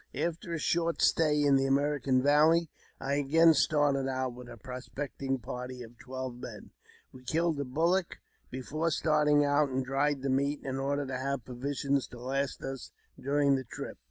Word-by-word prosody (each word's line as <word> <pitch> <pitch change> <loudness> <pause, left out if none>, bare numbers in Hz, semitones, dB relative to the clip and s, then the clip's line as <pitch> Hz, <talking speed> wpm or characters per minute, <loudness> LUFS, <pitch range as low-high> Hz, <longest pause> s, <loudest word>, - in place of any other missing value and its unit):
After 170 +1 -3
a 165 - -1
short 170 +1 0
stay 150 -2 +3
in 140 -1 +5
the 135 0 +1
American 135 -2 +1
Valley, 155 +3 +4 0.3
I 140 +1 -1
again 160 +4 +5
started 145 -2 +2
out 130 -1 -2
with 125 0 -11
a 120 - -10
prospecting 135 +2 -4
party 125 +1 -6
of 120 0 -14
twelve 130 -1 -6
men. 120 -4 -9 0.4
We 130 - -13
killed 160 +2 0
a 140 - -1
bullock 170 +7 0 0.3
before 150 +6 -2
starting 150 -2 +3
and 145 -2 +1
dried 135 +1 0
the 135 - 0
meat, 140 +2 0
in 135 -1 -3
order 140 +1 -1
to 130 -1 -4
have 135 -2 -3
provisions 140 +2 -1
to 120 - -12
last 135 +2 -2
us 135 -2 -6 0.3
during 140 +1 +2
the 135 -1 0
trip. 115 - -8
140 Hz, 170 wpm, -30 LUFS, 130-150 Hz, 0.4 s, in